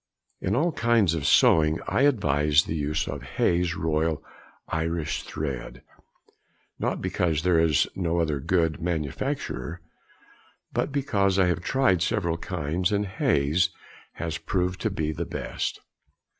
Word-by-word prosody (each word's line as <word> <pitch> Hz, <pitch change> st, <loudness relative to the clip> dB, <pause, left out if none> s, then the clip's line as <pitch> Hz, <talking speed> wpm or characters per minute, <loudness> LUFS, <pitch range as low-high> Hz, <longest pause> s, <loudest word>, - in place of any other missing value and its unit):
In -, -, 0 dB
all 165 Hz, +7 st, +2 dB
kinds 115 Hz, -, +2 dB
of 75 Hz, -3 st, -1 dB
sewing 80 Hz, +1 st, +5 dB
I -, -, +1 dB
advise 75 Hz, -, +3 dB
the -, -, -4 dB
use 75 Hz, 0 st, -1 dB
of -, -, -4 dB
Hayes' 85 Hz, 0 st, 0 dB
Royal 80 Hz, -1 st, 0 dB, 0.4 s
Irish 80 Hz, -1 st, -2 dB
thread, 70 Hz, -5 st, -5 dB, 1.0 s
not -, -, -1 dB
because 80 Hz, -3 st, 0 dB
there 90 Hz, -2 st, +4 dB
is 80 Hz, -4 st, +3 dB
no 85 Hz, -2 st, 0 dB
other 80 Hz, -3 st, 0 dB
of 65 Hz, -, -9 dB
good 80 Hz, -4 st, +1 dB
manufacture, 80 Hz, 0 st, -3 dB, 0.9 s
but -, -, -1 dB
because 100 Hz, -9 st, +1 dB
I 95 Hz, -, +5 dB
have 90 Hz, -1 st, 0 dB
tried 120 Hz, -5 st, +2 dB
several 85 Hz, -4 st, 0 dB
kinds, 85 Hz, +1 st, -2 dB
and 105 Hz, 0 st, +1 dB
Hayes' 85 Hz, -3 st, +1 dB, 0.4 s
has 85 Hz, -1 st, -4 dB
proved 90 Hz, 0 st, -1 dB
to 110 Hz, -, +1 dB
be 80 Hz, -6 st, -2 dB
the 80 Hz, +2 st, -4 dB
best. -, -, -4 dB
85 Hz, 140 wpm, -26 LUFS, 75-95 Hz, 1.0 s, sewing